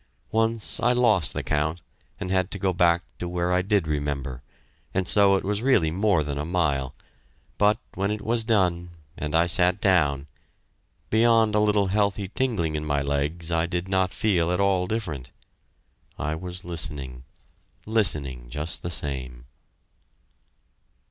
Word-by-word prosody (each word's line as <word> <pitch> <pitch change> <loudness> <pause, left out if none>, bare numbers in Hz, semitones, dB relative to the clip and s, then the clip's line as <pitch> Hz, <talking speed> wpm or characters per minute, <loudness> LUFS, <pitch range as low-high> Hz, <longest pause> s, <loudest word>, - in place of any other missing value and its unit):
Once 115 0 0
I 120 +1 +3
lost 110 - +3
the - - -3
count 75 +3 -1 0.4
and 90 - -4
had 95 0 +1
to 100 - -4
go 95 -1 0
back 85 -1 +3 0.2
to 90 - -4
where 90 0 -1
I 90 - +3
did 100 -3 +1
remember, 70 -4 -3 0.5
and 95 -1 0
so 100 -1 +5
it 95 - -1
was 105 +2 -1
really 110 -12 +3
more 95 -2 +2
than 70 -1 -4
a - - -2
mile. 75 -6 -1 0.6
But 105 +1 +4 0.2
when 100 +1 -1
it 105 0 -3
was 115 0 +1
done, 90 -6 +1 0.3
and 75 +1 -3
I 85 +1 +4
sat 90 +1 +2
down, 75 -9 +2 0.9
beyond 115 -1 +4
a 105 - +3
little 105 -1 +3
healthy 100 0 0
tingling 105 - -1
in 75 - -2
my 75 -2 0
legs 75 +4 -2
I 85 0 +1
did 90 +1 -3
not 95 -1 +1
feel 90 -6 +1
at 90 - 0
all 95 -2 +2
different. 80 - -4 0.9
I 75 +1 -2
was 90 +2 -6
listening 70 -7 -3 0.6
listening 75 - +1
just 75 +6 -4
the 85 - -4
same. 65 -6 -5
90 Hz, 155 wpm, -25 LUFS, 75-100 Hz, 0.9 s, so